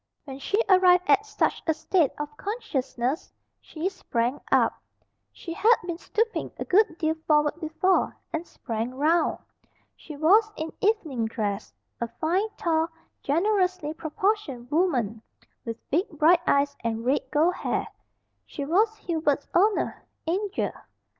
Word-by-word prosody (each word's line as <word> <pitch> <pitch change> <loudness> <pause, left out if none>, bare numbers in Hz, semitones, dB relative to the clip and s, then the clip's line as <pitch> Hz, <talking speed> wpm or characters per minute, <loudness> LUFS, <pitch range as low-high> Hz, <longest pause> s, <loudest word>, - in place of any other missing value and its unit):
When 270 -2 -8
she 400 +9 0
arrived 365 -2 +6
at 420 +2 +4
such 425 0 0
a 320 - +2
state 320 -1 +2
of 295 0 -5
consciousness 280 - -3 0.3
she 320 +3 -4
sprang 255 -9 -2
up - - +4 0.6
she 335 - -7
had 450 +7 +5
been 345 -1 -4
stooping 450 +4 -1
a - - -4
good 375 -3 +3
deal 315 -1 +1
forward 300 +1 +3
before 320 +4 +1 0.2
and 320 - -1
sprang 230 +1 -4
round. 315 +4 +2 0.6
She 305 -3 -10
was 415 +9 +4
in 315 +1 -5
evening 315 - +1
dress. 210 -2 -3 0.3
A 235 - 0
fine, 365 +7 +1
tall, 320 -1 +1 0.3
generously 365 0 +1
proportioned 315 - -2
woman, 250 - +1 0.4
with 230 -1 -7
big 345 +7 +1
bright 335 +4 +5
eyes, 285 0 +3
and 230 0 -2
red 270 +3 +2
gold 315 +4 +3
hair, - - -2 0.6
she 285 - -5
was 420 +8 +2
Hubert's 315 -7 -1
"oner" 405 +4 +2 0.2
"Angel." 390 +5 -1
320 Hz, 135 wpm, -26 LUFS, 280-375 Hz, 0.6 s, arrived